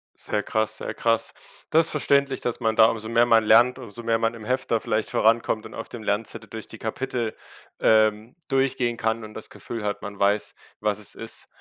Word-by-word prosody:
Sehr 105 Hz, -, -3 dB
krass, 110 Hz, 0 st, -1 dB
sehr -, -, -5 dB
krass. 115 Hz, -1 st, 0 dB, 0.4 s
Das 165 Hz, +1 st, +4 dB
verständlich, 140 Hz, -2 st, +2 dB
dass 120 Hz, 0 st, -2 dB
man 110 Hz, -2 st, +1 dB
da 110 Hz, -, +8 dB
umso 110 Hz, -1 st, -1 dB
mehr 115 Hz, +1 st, +4 dB
man 115 Hz, -2 st, +5 dB
lernt, 120 Hz, +4 st, +5 dB
umso 120 Hz, -1 st, -9 dB
mehr 115 Hz, 0 st, +1 dB
man 115 Hz, 0 st, 0 dB
im 110 Hz, -2 st, -10 dB
Hefter 125 Hz, -2 st, 0 dB
vielleicht 110 Hz, 0 st, -1 dB
vorankommt 110 Hz, -1 st, +2 dB
und -, -, -10 dB
auf 115 Hz, -, -7 dB
dem 115 Hz, -3 st, -8 dB
Lernzettel 105 Hz, +2 st, -2 dB
durch 110 Hz, -1 st, -8 dB
die 110 Hz, -, -10 dB
Kapitel, 120 Hz, 0 st, -3 dB, 0.4 s
ähm, 110 Hz, +3 st, +3 dB
durchgehen 130 Hz, -3 st, +1 dB
kann 110 Hz, 0 st, -1 dB
und 110 Hz, 0 st, -9 dB
das 110 Hz, -, -9 dB
Gefühl 115 Hz, -3 st, -7 dB
hat, 105 Hz, 0 st, -2 dB
man 100 Hz, -1 st, -7 dB
weiß, 100 Hz, +1 st, +1 dB, 0.3 s
was 105 Hz, -1 st, 0 dB
es 105 Hz, -, -10 dB
ist, 115 Hz, 0 st, -6 dB
115 Hz, 200 wpm, -25 LUFS, 110-120 Hz, 0.4 s, da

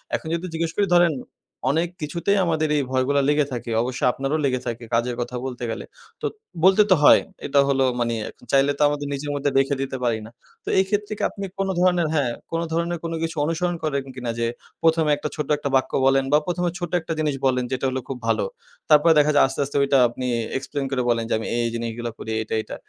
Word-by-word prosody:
এখন -, -, -5 dB
যদি 170 Hz, +2 st, -2 dB
জিজ্ঞেস 165 Hz, 0 st, -1 dB
করি, 205 Hz, -, +2 dB
ধরেন 175 Hz, -2 st, +5 dB, 0.6 s
অনেক 165 Hz, +3 st, 0 dB
কিছুতেই 170 Hz, +7 st, 0 dB
আমাদের 155 Hz, -2 st, 0 dB
এই 145 Hz, -, +2 dB
ভয়গুলা 130 Hz, +2 st, +2 dB
লেগে 150 Hz, -1 st, +3 dB
থাকে, 120 Hz, -1 st, -4 dB
অবশ্যই 125 Hz, 0 st, -1 dB
আপনারও 135 Hz, +4 st, -2 dB
লেগে 130 Hz, -2 st, +1 dB
থাকে 120 Hz, 0 st, -4 dB
কাজের 120 Hz, +1 st, +1 dB
কথা, 120 Hz, +1 st, -4 dB
বলতে 125 Hz, -2 st, -5 dB
গেলে -, -, -5 dB, 0.4 s
তো -, -, -3 dB, 0.4 s
বলতে 190 Hz, +3 st, +6 dB
তো 185 Hz, -, +9 dB
হয় -, -, +8 dB, 0.2 s
এটা 140 Hz, 0 st, +2 dB
হলো 135 Hz, -1 st, +2 dB, 0.2 s
মানি 120 Hz, -1 st, 0 dB, 0.4 s
চাইলে 140 Hz, +1 st, +4 dB
তো -, -, -5 dB
আমাদের 145 Hz, 0 st, -2 dB
নিজের 145 Hz, +1 st, -4 dB
মধ্যে 145 Hz, 0 st, 0 dB
রেখে 135 Hz, +1 st, +3 dB
দিতে 135 Hz, -1 st, -3 dB
পারি 115 Hz, -2 st, +1 dB
না। 115 Hz, -, -12 dB, 0.3 s
তো -, -, -6 dB
এই 190 Hz, -, +5 dB
ক্ষেত্রে 205 Hz, +1 st, -1 dB
কি -, -, -4 dB
আপনি 200 Hz, -1 st, -6 dB
কোনো 195 Hz, 0 st, 0 dB
ধরনের, 180 Hz, -3 st, +3 dB
হ্যাঁ। 135 Hz, -6 st, +1 dB, 0.2 s
কোনো 165 Hz, 0 st, -1 dB
ধরনের 170 Hz, +1 st, 0 dB
কোনো 165 Hz, 0 st, -3 dB
কিছু 165 Hz, 0 st, -3 dB
অনুসরণ 175 Hz, +2 st, -1 dB
করেন 140 Hz, -3 st, -1 dB
কিনা 125 Hz, -2 st, -3 dB
যে 115 Hz, -, +1 dB, 0.4 s
১ম 165 Hz, 0 st, +4 dB
এ -, -, +4 dB
একটা 150 Hz, -, -4 dB
ছোট্ট 150 Hz, -2 st, -4 dB
একটা 145 Hz, -1 st, -3 dB
বাক্য 130 Hz, -, +1 dB
বলেন 135 Hz, 0 st, +4 dB
বা -, -, +8 dB
১ম 180 Hz, 0 st, -1 dB
এ -, -, -5 dB
ছোট্ট 175 Hz, -2 st, -4 dB
একটা 165 Hz, 0 st, -4 dB
জিনিস 150 Hz, -3 st, 0 dB
বলেন 125 Hz, -1 st, +2 dB
যেটা 130 Hz, +1 st, -1 dB
হল, 130 Hz, -, -3 dB
খুব 135 Hz, -, -3 dB
ভালো 115 Hz, -, +1 dB, 0.4 s
তারপরে 155 Hz, +2 st, +6 dB
দেখা 150 Hz, +1 st, +4 dB
যায় 145 Hz, -, +6 dB
আস্তে, 135 Hz, -, -7 dB
আস্তে 145 Hz, -, -3 dB
ওইটা 140 Hz, 0 st, +3 dB
আপনি 125 Hz, +2 st, -5 dB, 0.3 s
এক্সপ্লেইন 135 Hz, +1 st, -4 dB
করে 130 Hz, -2 st, 0 dB
বলেন 115 Hz, -1 st, +2 dB
যে -, -, +1 dB
আমি 110 Hz, -, -5 dB
এই 120 Hz, -1 st, +1 dB
জিনিসগুলা 115 Hz, 0 st, -4 dB
করি 110 Hz, -, -6 dB
এইটা, 110 Hz, -, -5 dB
এইটা? -, -, -8 dB
145 Hz, 230 wpm, -23 LUFS, 130-165 Hz, 0.6 s, তো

